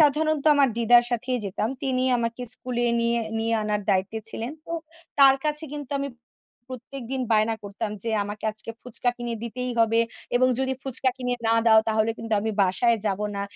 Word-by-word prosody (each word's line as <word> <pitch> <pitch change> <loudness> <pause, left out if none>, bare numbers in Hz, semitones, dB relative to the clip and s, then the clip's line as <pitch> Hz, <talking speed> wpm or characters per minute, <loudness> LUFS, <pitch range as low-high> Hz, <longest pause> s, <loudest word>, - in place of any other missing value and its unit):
সাধারণত 305 0 +3
আমার 280 -2 +4
দিদার 240 +1 +6
সাথেই 250 +1 -1
যেতাম। 200 +3 -2
তিনি 255 -2 0
আমাকে 230 +1 -3
স্কুলে 240 -1 -3 0.2
নিয়ে, 235 0 +1 0.2
নিয়ে 225 +1 0
আনার 210 0 -1
দায়িত্বে 195 +3 0
ছিলেন। 230 +5 -5
তো - - -6 0.5
তার 270 -1 +9
কাছে 300 +1 0
কিন্তু 290 -2 -6
আমি 280 - -2 0.7
প্রত্যেকদিন 260 +1 -6
বায়না 220 +1 +3
করতাম। 205 +2 -4
যে, 230 - -2
"আমাকে 205 +1 -7
আজকে 215 +1 -6
ফুচকা 245 0 -1
কিনে 240 -1 -4
দিতেই 250 +2 -4
হবে 225 0 +4 0.4
এবং 255 +1 +4
যদি 265 0 0
ফুচকা 260 0 0
কিনে 250 -1 -2
না 225 - +4
দাও 220 -1 +7
তাহলে 220 0 +2
কিন্তু 225 0 -5
আমি 220 - -1
বাসায় 225 +5 +2
যাব 195 0 -1 0.2
না।" 200 - -2
235 Hz, 175 wpm, -25 LUFS, 220-260 Hz, 0.7 s, তার